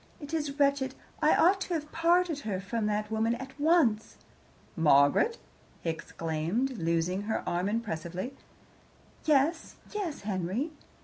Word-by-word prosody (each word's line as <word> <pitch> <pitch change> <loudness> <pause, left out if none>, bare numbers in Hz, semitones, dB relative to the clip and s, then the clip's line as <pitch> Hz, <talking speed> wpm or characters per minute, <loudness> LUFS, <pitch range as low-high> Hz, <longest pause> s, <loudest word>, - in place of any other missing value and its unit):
It 290 +1 -9
is 295 -3 -2
wretched. 280 -2 +2 0.3
I - - +5
ought 380 +3 +4
to 360 - -1
have 300 -1 -4
parted 335 -1 +2
her 205 -8 -3
from 210 +3 -2
that 210 0 -1
woman 225 +1 +1
at 265 +2 -8
once. 285 -9 +2 0.6
"Margaret!" 150 - +4 0.4
he 165 - 0
exclaimed, 165 +10 -2
loosing 170 +3 0
her 220 - -2
arm 175 +3 0
impressively. 190 0 -3 0.9
"Yes 310 +2 +2 0.2
yes, 385 -8 -3
Henry?" 200 - -2
230 Hz, 130 wpm, -29 LUFS, 185-300 Hz, 0.9 s, I